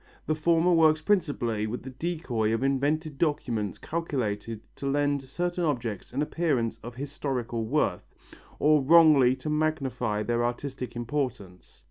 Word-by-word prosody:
The 155 Hz, -, +1 dB
former 165 Hz, +3 st, +3 dB
works 160 Hz, -2 st, +5 dB
principally 145 Hz, -, 0 dB
with 120 Hz, +3 st, -5 dB
the 130 Hz, -, -7 dB
decoy 125 Hz, -7 st, -1 dB
of 115 Hz, -, -2 dB
invented 145 Hz, +2 st, 0 dB
documents 120 Hz, -, -1 dB
calculated 115 Hz, -9 st, -3 dB, 0.2 s
to 140 Hz, -, -4 dB
lend 145 Hz, 0 st, +1 dB
certain 175 Hz, +6 st, -3 dB
objects 120 Hz, -, -2 dB
an 135 Hz, +4 st, 0 dB
appearance 145 Hz, -8 st, -1 dB
of 120 Hz, +1 st, -9 dB
historical 130 Hz, -4 st, -3 dB
worth, 110 Hz, -7 st, 0 dB, 0.5 s
or 150 Hz, 0 st, +4 dB
wrongly 145 Hz, -4 st, +6 dB
to 130 Hz, +4 st, -6 dB
magnify 135 Hz, -8 st, -1 dB
their 120 Hz, +1 st, 0 dB
artistic 125 Hz, 0 st, -4 dB
importance. 120 Hz, -7 st, -4 dB
135 Hz, 135 wpm, -27 LUFS, 120-155 Hz, 0.5 s, wrongly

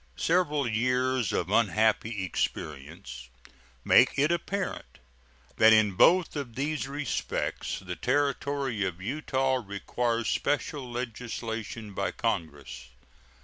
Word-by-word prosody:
Several 150 Hz, -6 st, +1 dB
years 125 Hz, 0 st, +1 dB
of -, -, -1 dB
unhappy 110 Hz, -1 st, +2 dB
experience 70 Hz, -6 st, -5 dB, 0.6 s
make -, -, +5 dB
it 145 Hz, +4 st, +3 dB
apparent 185 Hz, +3 st, -3 dB, 0.6 s
that 110 Hz, 0 st, +7 dB
in 110 Hz, -2 st, +5 dB
both 170 Hz, -, +4 dB
of 135 Hz, -6 st, -5 dB
these 145 Hz, +1 st, -2 dB
respects 145 Hz, +1 st, -3 dB
the 90 Hz, -2 st, -6 dB
Territory 140 Hz, -3 st, 0 dB
of 90 Hz, -2 st, -3 dB
Utah 130 Hz, +3 st, -1 dB
requires 115 Hz, +4 st, -2 dB
special 145 Hz, -1 st, -1 dB
legislation 115 Hz, -3 st, -5 dB
by -, -, -1 dB
Congress. 70 Hz, -6 st, -4 dB
120 Hz, 105 wpm, -28 LUFS, 100-140 Hz, 0.6 s, that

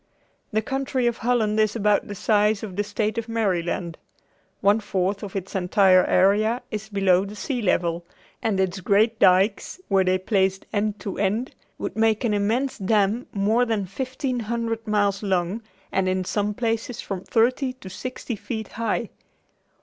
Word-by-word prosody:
The 220 Hz, 0 st, 0 dB
country 265 Hz, 0 st, -1 dB
of 240 Hz, -1 st, +1 dB
Holland 220 Hz, -3 st, +1 dB
is 215 Hz, 0 st, +2 dB
about 210 Hz, -2 st, +2 dB
the 205 Hz, -, -6 dB
size 210 Hz, +1 st, +2 dB
of 195 Hz, -4 st, -6 dB
the 205 Hz, -, 0 dB
state 210 Hz, +2 st, -1 dB
of 230 Hz, 0 st, -7 dB
Maryland. 180 Hz, -6 st, -1 dB, 0.6 s
One 205 Hz, +2 st, +4 dB
fourth 195 Hz, -1 st, -1 dB
of 205 Hz, -2 st, -7 dB
its 195 Hz, -1 st, -4 dB
entire 185 Hz, 0 st, +4 dB
area 210 Hz, +6 st, +3 dB
is 215 Hz, 0 st, -5 dB
below 195 Hz, -3 st, +3 dB
the 200 Hz, +1 st, -7 dB
sea 245 Hz, +3 st, -3 dB
level, 175 Hz, -4 st, 0 dB, 0.4 s
and 210 Hz, -4 st, 0 dB
its 190 Hz, 0 st, 0 dB
great 215 Hz, +4 st, +2 dB
dykes 195 Hz, -, +3 dB
were 195 Hz, -1 st, +4 dB
they 185 Hz, 0 st, +2 dB
placed 190 Hz, 0 st, 0 dB
end 210 Hz, 0 st, 0 dB
to 195 Hz, 0 st, -5 dB
end, 210 Hz, +6 st, 0 dB, 0.2 s
would -, -, -5 dB
make 220 Hz, 0 st, +2 dB
an 225 Hz, -3 st, +1 dB
immense 225 Hz, +7 st, 0 dB
dam 210 Hz, +3 st, +1 dB
more 215 Hz, +4 st, +2 dB
than 220 Hz, -5 st, -1 dB
fifteen 255 Hz, +5 st, -3 dB
hundred 230 Hz, 0 st, -3 dB
miles 205 Hz, -2 st, +1 dB
long 190 Hz, +1 st, -1 dB, 0.3 s
and 190 Hz, -1 st, +1 dB
in 185 Hz, 0 st, -1 dB
some 205 Hz, +2 st, -1 dB
places 230 Hz, 0 st, -2 dB
from 190 Hz, -2 st, -5 dB
thirty 255 Hz, +3 st, +1 dB
to 255 Hz, -7 st, -13 dB
sixty 245 Hz, +5 st, -5 dB
feet 220 Hz, 0 st, -5 dB
high. 230 Hz, 0 st, -2 dB
210 Hz, 165 wpm, -24 LUFS, 195-225 Hz, 0.6 s, One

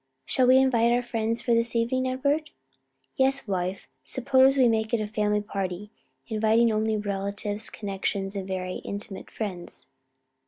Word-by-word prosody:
Shall 255 Hz, -1 st, +2 dB
we 255 Hz, +1 st, +7 dB
invite 240 Hz, -3 st, +4 dB
our 245 Hz, +1 st, +2 dB
friends 230 Hz, -1 st, -2 dB
for 240 Hz, -, +2 dB
this 230 Hz, +1 st, +1 dB
evening, 255 Hz, +3 st, +1 dB
Edward?" 285 Hz, +4 st, 0 dB, 0.7 s
"Yes, 270 Hz, -1 st, +2 dB
wife; 185 Hz, -1 st, -2 dB, 0.2 s
suppose 265 Hz, +1 st, +3 dB
we 255 Hz, -2 st, +6 dB
make 220 Hz, 0 st, +1 dB
it -, -, -1 dB
a 215 Hz, -, -1 dB
family 210 Hz, 0 st, 0 dB
party, 200 Hz, -1 st, -4 dB, 0.3 s
inviting 225 Hz, +1 st, +3 dB
only 215 Hz, 0 st, +1 dB
relatives, 205 Hz, +1 st, -3 dB
connections 195 Hz, -1 st, -3 dB
and 195 Hz, -1 st, -4 dB
very 185 Hz, -1 st, -3 dB
intimate 200 Hz, -1 st, -7 dB
friends." 185 Hz, -9 st, -5 dB
220 Hz, 150 wpm, -26 LUFS, 200-245 Hz, 0.7 s, we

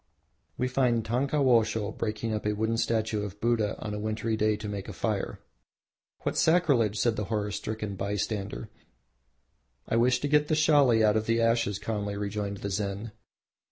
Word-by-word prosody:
We 125 Hz, -, 0 dB
find 125 Hz, -3 st, +1 dB
Tankawosho 120 Hz, -4 st, +2 dB
breaking 110 Hz, +1 st, -2 dB
up 105 Hz, 0 st, -2 dB
a 105 Hz, -, +1 dB
wooden 110 Hz, +2 st, 0 dB
statue 110 Hz, -2 st, 0 dB
of 105 Hz, 0 st, -6 dB
Buddha 115 Hz, -3 st, +1 dB
on 105 Hz, -1 st, -5 dB
a 105 Hz, -, -3 dB
wintry 110 Hz, +1 st, -1 dB
day 110 Hz, 0 st, +2 dB
to 105 Hz, 0 st, -6 dB
make 100 Hz, -2 st, -5 dB
a -, -, -6 dB
fire. -, -, -2 dB, 0.8 s
"What -, -, -2 dB
sacrilege!" 140 Hz, -, +3 dB
said 115 Hz, -2 st, +1 dB
the 105 Hz, -, -2 dB
horror 105 Hz, -1 st, -2 dB
stricken 105 Hz, -1 st, -4 dB
bystander. 105 Hz, +2 st, -3 dB, 1.2 s
"I 115 Hz, -, +1 dB
wish 125 Hz, +2 st, +3 dB
to 145 Hz, -, 0 dB
get 150 Hz, 0 st, +3 dB
the 155 Hz, -, +2 dB
Shali 145 Hz, -7 st, +4 dB
out 105 Hz, 0 st, +4 dB
of 110 Hz, -, -2 dB
the 115 Hz, 0 st, +2 dB
ashes," 115 Hz, -3 st, +2 dB
calmly 105 Hz, -1 st, -3 dB
rejoined 100 Hz, 0 st, -3 dB
the 100 Hz, -, -2 dB
Zen. 100 Hz, +2 st, -3 dB
110 Hz, 170 wpm, -28 LUFS, 105-120 Hz, 1.2 s, Shali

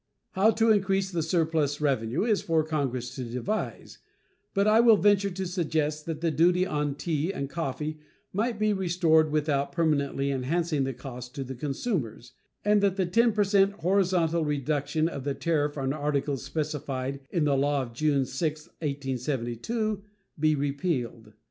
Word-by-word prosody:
How 200 Hz, +2 st, +4 dB
to 225 Hz, 0 st, +3 dB
increase 195 Hz, -2 st, +1 dB
the 170 Hz, -2 st, -1 dB
surplus 160 Hz, -3 st, 0 dB
revenue 135 Hz, -, 0 dB
is 215 Hz, -3 st, +2 dB
for 160 Hz, -2 st, +1 dB
Congress 130 Hz, -6 st, -2 dB
to 130 Hz, -, -5 dB
devise, 125 Hz, -, -4 dB, 0.6 s
but 200 Hz, +1 st, +3 dB
I 215 Hz, +1 st, +5 dB
will 230 Hz, -2 st, +7 dB
venture 200 Hz, 0 st, +3 dB
to 190 Hz, +1 st, -4 dB
suggest 155 Hz, -4 st, -1 dB
that 160 Hz, -2 st, -4 dB
the 165 Hz, -1 st, +1 dB
duty 180 Hz, +3 st, +3 dB
on 150 Hz, -4 st, -1 dB
tea 155 Hz, +3 st, -1 dB
and 140 Hz, -8 st, -4 dB
coffee 155 Hz, 0 st, -4 dB, 0.3 s
might 225 Hz, +3 st, 0 dB
be 215 Hz, 0 st, +2 dB
restored 170 Hz, -5 st, +3 dB
without 145 Hz, -2 st, 0 dB
permanently 140 Hz, -3 st, 0 dB
enhancing 145 Hz, +2 st, 0 dB
the 135 Hz, -, -2 dB
cost 125 Hz, -1 st, -9 dB
to 135 Hz, -, -3 dB
the 130 Hz, 0 st, -6 dB
consumers, 130 Hz, -, -3 dB, 0.3 s
and 210 Hz, 0 st, +4 dB
that 200 Hz, -2 st, +2 dB
the 190 Hz, -2 st, +1 dB
10 230 Hz, +6 st, +3 dB
per 210 Hz, 0 st, +3 dB
cent 200 Hz, 0 st, +3 dB
horizontal 180 Hz, -3 st, +1 dB
reduction 150 Hz, +1 st, 0 dB
of 140 Hz, -5 st, -5 dB
the 140 Hz, 0 st, -2 dB
tariff 150 Hz, -3 st, 0 dB
on 135 Hz, -1 st, -1 dB
articles 145 Hz, -2 st, -1 dB
specified 140 Hz, -2 st, -3 dB
in 170 Hz, -4 st, 0 dB
the 145 Hz, -2 st, +2 dB
law 140 Hz, 0 st, +1 dB
of 120 Hz, -2 st, -9 dB
June 140 Hz, +1 st, +1 dB
6, 155 Hz, +3 st, -3 dB
1872, 140 Hz, -, -2 dB, 0.4 s
be 155 Hz, 0 st, +3 dB
repealed. 140 Hz, -, -2 dB
155 Hz, 160 wpm, -27 LUFS, 140-185 Hz, 0.6 s, will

